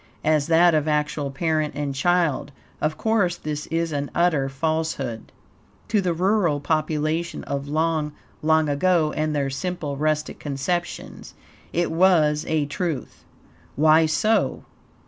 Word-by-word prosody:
As 155 -2 +2
that 170 +1 +5
of 155 -1 +1
actual 150 -1 0
PARENT 155 +2 -1
and 145 -1 -2
CHILD, 155 -1 +1 0.3
of 155 +1 0
course 205 -6 +1
this 150 -1 -5
is 165 0 -1
an 145 -1 -2
utter 160 -6 +2
falsehood. 140 -5 -2 0.6
To 210 -1 +2
the 175 -3 0
rural 180 -4 +2
population 155 +2 -1
of 140 0 -4
long, 155 0 0 0.3
long 160 0 +3
ago, 155 +1 +2
and 155 0 -1
their 140 -2 0
simple, 155 -1 -3
rustic 155 0 -1
conceptions, 155 +5 -4 0.4
IT 175 +1 0
WAS 160 -4 +3
A 155 -2 +1
TRUTH. 150 -1 -4 0.5
Why 155 +2 +5
so? 215 +8 +1
155 Hz, 130 wpm, -23 LUFS, 145-170 Hz, 0.6 s, that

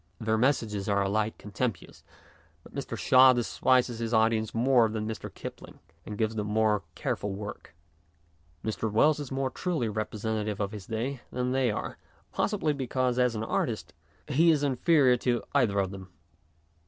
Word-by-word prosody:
Their 110 0 0
messages 110 -5 0
are 100 -1 +2
alike 105 +2 -1
contemptuous; 105 +1 -4 0.6
but - - -16
Mr. - - -5
Shaw 130 0 +6
despises 125 0 +1
his 115 0 -1
audience 110 -1 +2
more 120 -1 +3
than 110 0 -3
Mr. 110 - -6
Kipling, - - -9 0.3
and 105 - -6
gives 110 0 0
them 105 -2 -3
more 105 -1 +2
careful 100 -1 -2
work. 105 -6 -8 0.9
Mr. 110 0 -2
Wells 150 +8 +4
is 145 -3 -6
more 135 0 -1
truly 160 -11 -2
representative 110 0 -3
of 100 -1 -1
his 105 -4 -9
day 120 +4 -3
than 125 0 -1
they 130 -1 +2
arc, 105 - -4 0.3
possibly 195 -8 0
because, 130 -2 -1
as 125 -2 +2
an 110 - -3
artist, - - -2 0.3
he 155 +4 +4
is 150 -3 +3
inferior 135 -1 +3
to 120 -1 0
either 120 -8 +2
of 95 -1 +1
them. 95 -1 -9
115 Hz, 160 wpm, -28 LUFS, 105-130 Hz, 0.9 s, Shaw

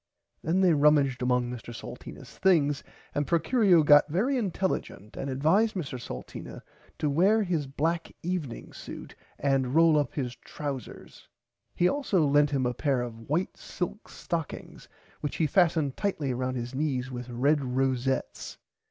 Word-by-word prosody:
Then 175 +5 +1
they 180 -3 +5
rumaged 145 -3 +3
among 125 -1 +1
Mr 120 -1 -8
Salteenas - - -10
things 150 -7 +3 0.3
and 145 -1 -1
Procurio 175 - +4
got 145 0 +6
very 215 - +1
intelligent 190 - -2
and 135 - -4
advised 165 +12 +2
Mr 135 -8 -4
Salteena 60 - -8 0.3
to 150 - -1
were 190 +10 +3
his 165 -7 -1
black 165 +5 -1
evening 165 -8 -4
suit - - -9 0.2
and 135 -1 +1
role 165 -2 +6
up 145 -4 -2
his 125 -4 -3
trousers. 140 -4 -7 0.5
He 175 - +3
also 200 - +1
lent 145 +1 +4
him 135 -3 0
a 125 - 0
pair 135 0 0
of 115 -1 -9
white 170 +6 0
silk 185 +4 -5
stockings 165 -4 -5 0.3
which 145 - -4
he 160 - +1
fastened 160 -4 +2
tightly 155 -10 -1
round 130 +1 -2
his 120 +1 -5
knees 130 -3 -1
with 125 0 -6
red 140 +5 +2
rosettes. 130 0 -1
145 Hz, 150 wpm, -28 LUFS, 130-170 Hz, 0.5 s, got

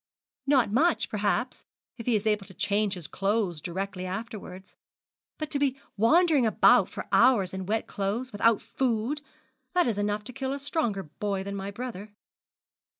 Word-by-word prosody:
'Not 260 -7 +3
much, 310 +9 +2
perhaps, 210 +4 -1 0.4
if 230 - -7
he 240 - +3
is 210 0 -1
able 210 -2 +1
to 190 - -14
change 205 0 +1
his 175 -4 -7
clothes 195 -4 -1
directly 185 +2 -4
afterwards. 190 -2 -7 0.6
But 310 0 -5
to 285 - +1
be 275 -1 0 0.2
wandering 300 - +4
about 220 - +5
for - - -7
hours 230 -7 +4
in 190 -1 -5
wet 220 +2 0
clothes, 215 +6 -3
without 225 +1 +2
food, 255 +3 -1 0.5
that 355 - +4
is 220 -4 -1
enough 205 0 -1
to 250 - -9
kill 265 +2 -3
a 280 - -4
stronger 275 -9 -1
boy 195 +5 -3
than 200 0 -5
my 195 0 -4
brother.' 210 -2 -7
210 Hz, 165 wpm, -27 LUFS, 195-255 Hz, 0.6 s, about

